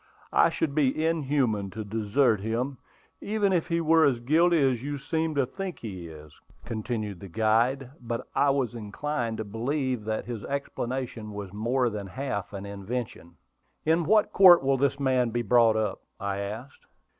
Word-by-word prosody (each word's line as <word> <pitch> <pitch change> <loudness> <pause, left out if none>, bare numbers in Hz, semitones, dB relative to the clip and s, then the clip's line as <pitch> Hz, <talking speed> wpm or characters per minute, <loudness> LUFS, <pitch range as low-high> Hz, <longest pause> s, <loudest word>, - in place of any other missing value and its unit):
I - - +5
should 150 -3 -2
be 150 +1 +1
inhuman 135 -10 0
to 110 +3 -6
desert 110 +3 +1
him, 120 +6 -2 0.4
even 205 -2 +1
if 170 -3 +1
he 170 -1 0
were 165 0 +4
as 130 -5 +3
guilty 165 +7 +3
as 125 -3 0
you 145 +2 -4
seem 160 +3 -2
to 140 -2 +2
think 190 +7 -6
he 95 -7 -7
is," 75 -2 -12 0.3
continued 110 -4 -4
the 100 - -9
guide; 115 +7 +1
but 115 -1 -4
I 145 - +3
was 135 -4 0
inclined 115 +2 -3
to 110 - -3
believe 125 +3 -2
that 110 0 -2
his 120 -4 -6
explanation 125 -5 -4
was 100 -2 -7
more 120 +4 +1
than 105 -2 -5
half 100 -3 -4
an 100 -1 -6
invention. 100 -3 -6 0.5
"In 160 +1 +2
what 215 +3 +3
court 180 -5 +8
will 135 0 +2
this 140 +1 +1
man 130 -3 +2
be 120 +1 -1
brought 115 -1 +4
up?" 110 -2 -1 0.2
I 100 0 -2
asked. 110 +7 -7
120 Hz, 170 wpm, -27 LUFS, 110-140 Hz, 0.5 s, court